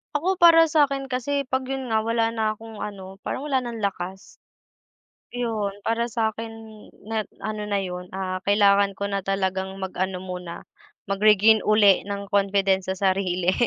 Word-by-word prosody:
Ako 365 Hz, +6 st, +1 dB
para 335 Hz, -2 st, +7 dB
sakin 280 Hz, -3 st, +1 dB
kasi 270 Hz, +2 st, -2 dB
pag 260 Hz, 0 st, -1 dB
yun 265 Hz, 0 st, -4 dB
nga 220 Hz, -1 st, +1 dB
wala 230 Hz, 0 st, 0 dB
na 220 Hz, -1 st, +1 dB
akong 220 Hz, 0 st, -8 dB
ano 195 Hz, -2 st, -8 dB
parang 285 Hz, -, -4 dB
wala 265 Hz, -3 st, +1 dB
ng 235 Hz, -2 st, -6 dB
lakas. 190 Hz, -2 st, -5 dB, 0.9 s
Yun 220 Hz, -5 st, -3 dB
para 235 Hz, +1 st, 0 dB
sakin 225 Hz, 0 st, -3 dB, 0.5 s
net 215 Hz, -1 st, -3 dB, 0.2 s
ano 210 Hz, -1 st, -4 dB
na 200 Hz, -, 0 dB
yun, 180 Hz, 0 st, -6 dB
ah, 185 Hz, -1 st, -3 dB
kailangan 200 Hz, -1 st, +4 dB
ko 200 Hz, -, -4 dB
na 200 Hz, -1 st, -1 dB
talagang 190 Hz, 0 st, -2 dB
mag 190 Hz, -1 st, -5 dB
ano 185 Hz, 0 st, -2 dB
muna, 180 Hz, -2 st, -7 dB, 0.4 s
mag-regain 210 Hz, +2 st, +4 dB
uli 210 Hz, -3 st, +5 dB
ng 200 Hz, 0 st, -5 dB
confidence 195 Hz, -1 st, +2 dB
sa 190 Hz, -, -1 dB, 0.2 s
sarili 185 Hz, -1 st, 0 dB
210 Hz, 160 wpm, -24 LUFS, 190-230 Hz, 0.9 s, para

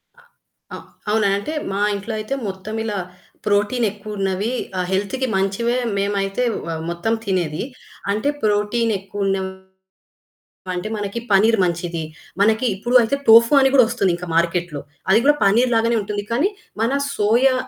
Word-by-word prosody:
అ -, -, -22 dB, 0.6 s
అ -, -, -6 dB, 0.3 s
అవునా! 215 Hz, -1 st, +2 dB
అంటే, 300 Hz, +10 st, -4 dB, 0.2 s
మా 195 Hz, -, -2 dB, 0.2 s
ఇంట్లో 200 Hz, +3 st, -5 dB
అయితే 215 Hz, +5 st, -4 dB
మొత్తం 195 Hz, +3 st, -6 dB
ఇలా 210 Hz, -2 st, -3 dB, 0.5 s
ప్రోటీనెక్కువున్నవి. 205 Hz, -1 st, 0 dB, 0.3 s
ఆహ్, 180 Hz, -, -1 dB
హెల్త్‌కి 205 Hz, +7 st, -1 dB
మంచివే. 230 Hz, +6 st, 0 dB, 0.2 s
మేమైతే 200 Hz, +3 st, -1 dB, 0.2 s
వ -, -, -4 dB, 0.2 s
మొత్తం 170 Hz, +6 st, -1 dB
తినేది. 175 Hz, -6 st, -1 dB, 0.5 s
అంటే 215 Hz, +7 st, 0 dB
ప్రోటీనెక్కువున్నవి 205 Hz, -3 st, 0 dB, 1.2 s
అంటే, 180 Hz, +4 st, -3 dB
మనకి 205 Hz, +2 st, -4 dB
పన్నీర్ 215 Hz, +3 st, +4 dB
మంచిది. 170 Hz, -1 st, -2 dB, 0.4 s
మనకి 220 Hz, +4 st, +3 dB
ఇప్పుడు 240 Hz, +6 st, -3 dB
అయితే, 230 Hz, +5 st, 0 dB
టోఫు 230 Hz, +3 st, +8 dB
అని 270 Hz, 0 st, +4 dB
కూడా 255 Hz, -3 st, +7 dB
ఒస్తుంది 195 Hz, -7 st, +1 dB, 0.2 s
మార్కెట్‌లో. 170 Hz, -3 st, 0 dB, 0.3 s
అది 215 Hz, -, +6 dB
కూడా 295 Hz, -, +6 dB
పన్నీర్ 235 Hz, +5 st, +3 dB
లాగానే 230 Hz, +1 st, +2 dB
ఉంటుంది 205 Hz, 0 st, -3 dB
కానీ, 280 Hz, +11 st, +2 dB, 0.3 s
మన 230 Hz, -, +2 dB, 0.3 s
సోయా 235 Hz, +6 st, +3 dB
205 Hz, 130 wpm, -21 LUFS, 195-230 Hz, 1.2 s, టోఫు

